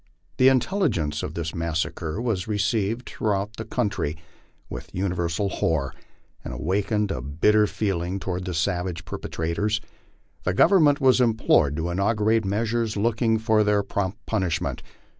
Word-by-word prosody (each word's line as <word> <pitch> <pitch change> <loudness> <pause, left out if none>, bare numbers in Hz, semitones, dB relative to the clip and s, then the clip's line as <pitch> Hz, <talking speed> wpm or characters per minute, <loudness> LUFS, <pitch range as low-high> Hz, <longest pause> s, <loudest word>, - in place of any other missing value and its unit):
The 130 - +6
intelligence 130 - +1
of 75 - -5
this 80 -2 -3
massacre 80 +1 -2
was 115 -5 -1
received 110 +2 0
throughout 105 0 -2
the 110 - -5
country 100 -8 -1 0.5
with - - -8
universal 90 0 -1
horror, 70 -8 -1 0.5
and - - -6
awakened 100 - 0
a 65 - -3
bitter 105 - +3
feeling 95 -3 -2
toward 90 -1 -3
the 90 -2 -3
savage 90 -1 -1
perpetra 80 0 -4
tors. 105 +4 0 0.6
The 90 - 0
Government 155 - +5
was 130 -1 +5
implored 110 - +3
to 80 +3 -2
inaugurate 105 +3 +1
measures 110 +2 -1
looking 115 +1 +2
to 110 -1 +3
their 105 -1 +2
prompt 100 0 -2
punishment. 95 -6 -1
100 Hz, 140 wpm, -25 LUFS, 85-110 Hz, 0.6 s, The